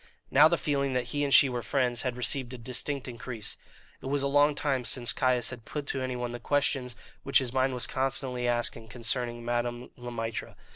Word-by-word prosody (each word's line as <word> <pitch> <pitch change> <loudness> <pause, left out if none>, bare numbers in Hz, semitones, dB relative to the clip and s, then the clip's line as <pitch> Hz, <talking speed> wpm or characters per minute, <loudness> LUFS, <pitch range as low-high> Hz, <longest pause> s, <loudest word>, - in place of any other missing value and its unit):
Now 145 +3 +8
the 170 +1 +1
feeling 140 -3 0
that 125 -1 -1
he 145 0 0
and 140 - 0
she 140 - +8
were 125 -2 -3
friends 120 0 +1
had 125 -2 -2
received 125 0 0
a - - -7
distinct 130 +3 -1
increase. 120 -2 -5 0.5
It - - -6
was 140 0 0
a - - +2
long 145 +1 +4
time 135 -4 0
since 120 0 0
Caius 125 -2 +2
had 120 -2 -8
put 145 +5 -5
to 135 - -2
anyone 125 -2 -3
the 120 - -6
questions 130 -1 0 0.3
which 135 - +3
his 130 -2 +1
mind 130 0 +1
was 120 - -1
constantly 130 -1 0
asking 120 -1 -1
concerning 120 0 -2
Madame 120 +1 -2
Le 120 -1 -7
Maître. 115 -2 -4
125 Hz, 205 wpm, -29 LUFS, 120-135 Hz, 0.5 s, Now